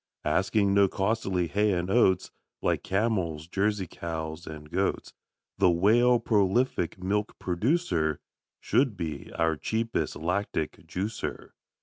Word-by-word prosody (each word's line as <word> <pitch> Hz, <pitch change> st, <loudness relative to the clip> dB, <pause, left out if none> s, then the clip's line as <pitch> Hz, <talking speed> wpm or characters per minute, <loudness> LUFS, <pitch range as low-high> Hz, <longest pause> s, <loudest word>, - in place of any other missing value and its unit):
Asking 100 Hz, +1 st, +2 dB
no 100 Hz, 0 st, +5 dB
costly 95 Hz, -2 st, 0 dB
hay 105 Hz, +4 st, +1 dB
and 90 Hz, 0 st, -1 dB
oats, 95 Hz, -6 st, +3 dB, 0.3 s
Like -, -, +1 dB
camels, 95 Hz, -7 st, -1 dB
Jersey 100 Hz, +1 st, 0 dB
cows, 80 Hz, 0 st, -6 dB
and 75 Hz, -1 st, -9 dB
goats, 95 Hz, +2 st, -1 dB, 0.5 s
The 90 Hz, -, +5 dB
Whale, 115 Hz, +8 st, +4 dB
prolific 105 Hz, -3 st, +1 dB
milk 100 Hz, +3 st, -2 dB
producer, 90 Hz, -, 0 dB, 0.4 s
Should 125 Hz, -5 st, +1 dB
be 80 Hz, -4 st, -5 dB
our 80 Hz, -1 st, +1 dB
cheapest 115 Hz, +8 st, -2 dB
lactic 90 Hz, -1 st, -2 dB
juicer. 100 Hz, +4 st, -4 dB
95 Hz, 115 wpm, -28 LUFS, 85-105 Hz, 0.5 s, no